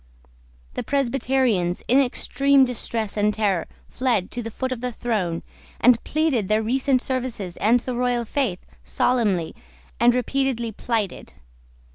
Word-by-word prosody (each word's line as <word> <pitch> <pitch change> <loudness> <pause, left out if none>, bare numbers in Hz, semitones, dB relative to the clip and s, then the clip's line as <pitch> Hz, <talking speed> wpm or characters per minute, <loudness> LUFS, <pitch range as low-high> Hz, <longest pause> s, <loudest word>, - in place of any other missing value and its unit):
The - - -3
Presbyterians, 255 -9 0
in 260 +3 +5
extreme 275 +1 +3
distress 230 -3 -3
and 210 0 +3
terror, 205 -5 0 0.2
fled 245 -8 -1
to 245 - -3
the 225 - -5
foot 260 +3 -4
of 250 -2 -4
the 250 0 -2
throne, 205 -8 -2 0.4
and 240 -1 +5
pleaded 290 -10 0
their 215 +1 +2
recent 260 +2 +1
services 245 -9 -3
and 230 +4 +3
the 250 0 -4
royal 245 -1 0
faith 225 -8 -2 0.2
solemnly 205 -10 +1 0.5
and 240 +1 +5
repeatedly 250 -2 -1
plighted. 215 - -3
240 Hz, 135 wpm, -23 LUFS, 210-260 Hz, 0.5 s, in